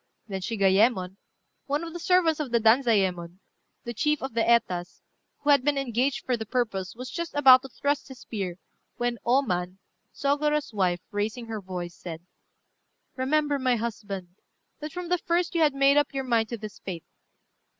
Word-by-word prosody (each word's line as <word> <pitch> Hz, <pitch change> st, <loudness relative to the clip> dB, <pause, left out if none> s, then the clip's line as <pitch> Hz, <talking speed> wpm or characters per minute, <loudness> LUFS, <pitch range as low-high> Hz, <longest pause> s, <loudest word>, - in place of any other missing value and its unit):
Then 195 Hz, -3 st, -4 dB
Shigayémon, 195 Hz, -2 st, +2 dB, 0.5 s
one 290 Hz, +3 st, -1 dB
of 330 Hz, -1 st, -7 dB
the 345 Hz, -, -6 dB
servants 340 Hz, -3 st, +3 dB
of 295 Hz, -4 st, -2 dB
Danzayémon, 215 Hz, -7 st, +2 dB, 0.5 s
the 235 Hz, -, -5 dB
chief 300 Hz, +6 st, 0 dB
of 265 Hz, -, -4 dB
the 230 Hz, -, +1 dB
Etas, 190 Hz, -7 st, +1 dB, 0.4 s
who 295 Hz, -, +3 dB
had 280 Hz, -3 st, +5 dB
been 290 Hz, 0 st, +1 dB
engaged 260 Hz, 0 st, -1 dB
for 255 Hz, -, +1 dB
the 220 Hz, -1 st, -5 dB
purpose, 215 Hz, -6 st, -2 dB
was 255 Hz, +2 st, -7 dB
just 340 Hz, -2 st, -5 dB
about 260 Hz, -3 st, +8 dB
to 270 Hz, -, -10 dB
thrust 285 Hz, +3 st, -1 dB
his 265 Hz, -2 st, -11 dB
spear, 195 Hz, -7 st, -5 dB, 0.4 s
when 240 Hz, -1 st, -1 dB
O 255 Hz, +4 st, +3 dB
Man, 180 Hz, -4 st, -2 dB, 0.3 s
Sôgorô's 295 Hz, -1 st, 0 dB
wife, 180 Hz, -4 st, +1 dB
raising 215 Hz, +3 st, -2 dB
her 220 Hz, -2 st, -5 dB
voice, 180 Hz, -2 st, -6 dB
said 170 Hz, -1 st, -9 dB, 0.9 s
"Remember, 290 Hz, +2 st, +1 dB
my 255 Hz, -2 st, +2 dB
husband, 205 Hz, -5 st, -5 dB, 0.5 s
that 300 Hz, 0 st, -6 dB
from 355 Hz, +1 st, -6 dB
the 360 Hz, 0 st, +2 dB
first 345 Hz, +1 st, 0 dB
you 335 Hz, -, +1 dB
had 295 Hz, -3 st, +3 dB
made 275 Hz, +1 st, +4 dB
up 290 Hz, -1 st, +1 dB
your 270 Hz, -, -1 dB
mind 230 Hz, -3 st, +1 dB
to 235 Hz, -, -4 dB
this 215 Hz, -1 st, -9 dB
fate. 175 Hz, -4 st, -7 dB
240 Hz, 175 wpm, -26 LUFS, 200-285 Hz, 0.9 s, about